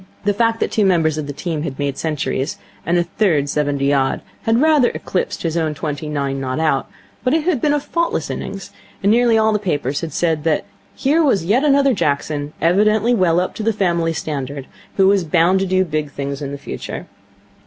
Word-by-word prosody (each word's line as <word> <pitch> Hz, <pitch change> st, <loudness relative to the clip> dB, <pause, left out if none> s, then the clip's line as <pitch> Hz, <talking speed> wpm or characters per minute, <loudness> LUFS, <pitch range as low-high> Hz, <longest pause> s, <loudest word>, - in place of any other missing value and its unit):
The 205 Hz, -, +3 dB
fact 230 Hz, +2 st, +1 dB
that -, -, 0 dB
two 215 Hz, -, +2 dB
members 165 Hz, -5 st, +2 dB
of 145 Hz, -, -4 dB
the -, -, -4 dB
team 155 Hz, +2 st, -4 dB
had 145 Hz, -4 st, -4 dB
made 140 Hz, -1 st, -2 dB
centuries, 150 Hz, -2 st, -2 dB, 0.3 s
and 170 Hz, +1 st, +2 dB
a 175 Hz, -, +3 dB
third 165 Hz, -5 st, +1 dB
seventy 145 Hz, -1 st, +1 dB
odd, 135 Hz, -1 st, +1 dB, 0.2 s
had 225 Hz, 0 st, +3 dB
rather 300 Hz, -3 st, +4 dB
eclipsed 185 Hz, -, -3 dB
his 165 Hz, -1 st, -1 dB
own 160 Hz, -2 st, 0 dB
twenty 150 Hz, -1 st, -4 dB
nine 140 Hz, -2 st, -2 dB
not 130 Hz, +2 st, -2 dB
out; 155 Hz, -4 st, +1 dB, 0.3 s
but 255 Hz, +4 st, +2 dB
it 320 Hz, -, +1 dB
had 320 Hz, -7 st, 0 dB
been 300 Hz, -, +2 dB
a 295 Hz, -, +2 dB
faultless 335 Hz, +4 st, -2 dB
innings, -, -, -6 dB, 0.3 s
and 200 Hz, -, +4 dB
nearly 235 Hz, 0 st, +4 dB
all 220 Hz, 0 st, +3 dB
the 210 Hz, -, +1 dB
papers 145 Hz, -8 st, -1 dB
had 165 Hz, -2 st, -4 dB
said 160 Hz, -3 st, 0 dB
that 160 Hz, -1 st, +1 dB, 0.3 s
here 295 Hz, +5 st, +2 dB
was 210 Hz, -, +2 dB
yet 230 Hz, -, +2 dB
another 275 Hz, -2 st, +4 dB
Jackson, 145 Hz, -4 st, -1 dB
evidently 215 Hz, +6 st, +3 dB
well 180 Hz, -6 st, +3 dB
up 180 Hz, -, -2 dB
to -, -, -6 dB
the 225 Hz, +1 st, +2 dB
family 170 Hz, -5 st, +1 dB
standard, 140 Hz, -4 st, -4 dB, 0.3 s
who 190 Hz, -1 st, +5 dB
was 195 Hz, -1 st, +3 dB
bound 170 Hz, +3 st, +3 dB
to 195 Hz, -, -1 dB
do 185 Hz, 0 st, +2 dB
big 155 Hz, -3 st, -2 dB
things 140 Hz, 0 st, -5 dB
in 140 Hz, -1 st, -4 dB
the 140 Hz, -, -5 dB
future. -, -, -6 dB
170 Hz, 210 wpm, -19 LUFS, 145-215 Hz, 0.3 s, who